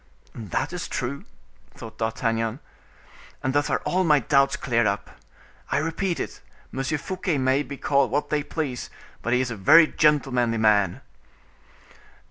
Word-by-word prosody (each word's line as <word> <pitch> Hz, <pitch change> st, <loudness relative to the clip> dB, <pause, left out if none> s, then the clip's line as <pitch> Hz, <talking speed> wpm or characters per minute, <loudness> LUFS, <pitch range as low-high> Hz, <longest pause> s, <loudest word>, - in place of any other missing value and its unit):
"That 110 Hz, -, -3 dB
is 180 Hz, -, -4 dB
true," 135 Hz, +3 st, -4 dB, 0.5 s
thought 110 Hz, -1 st, -11 dB
D'Artagnan, 115 Hz, +1 st, -1 dB, 0.8 s
"and 130 Hz, -, 0 dB
thus 145 Hz, 0 st, +1 dB
are -, -, -1 dB
all 185 Hz, +1 st, +1 dB
my 155 Hz, -4 st, +5 dB
doubts 140 Hz, -1 st, +2 dB
cleared 120 Hz, -4 st, +1 dB
up. 100 Hz, 0 st, -2 dB, 0.6 s
I -, -, +2 dB
repeat 165 Hz, +3 st, -1 dB
it, -, -, -5 dB, 0.3 s
Monsieur 135 Hz, +3 st, -2 dB
Fouquet 180 Hz, 0 st, -2 dB
may 130 Hz, +1 st, +2 dB
be 140 Hz, -1 st, -7 dB
called 140 Hz, -2 st, +2 dB
what 145 Hz, +5 st, -1 dB
they 150 Hz, -1 st, +1 dB
please, 145 Hz, -4 st, -4 dB, 0.3 s
but 120 Hz, -, -2 dB
he 125 Hz, +1 st, +3 dB
is 125 Hz, -2 st, -2 dB
a -, -, -3 dB
very 155 Hz, -, +7 dB
gentlemanly 135 Hz, -7 st, +2 dB
man." 105 Hz, -4 st, +2 dB
135 Hz, 150 wpm, -24 LUFS, 115-150 Hz, 0.8 s, very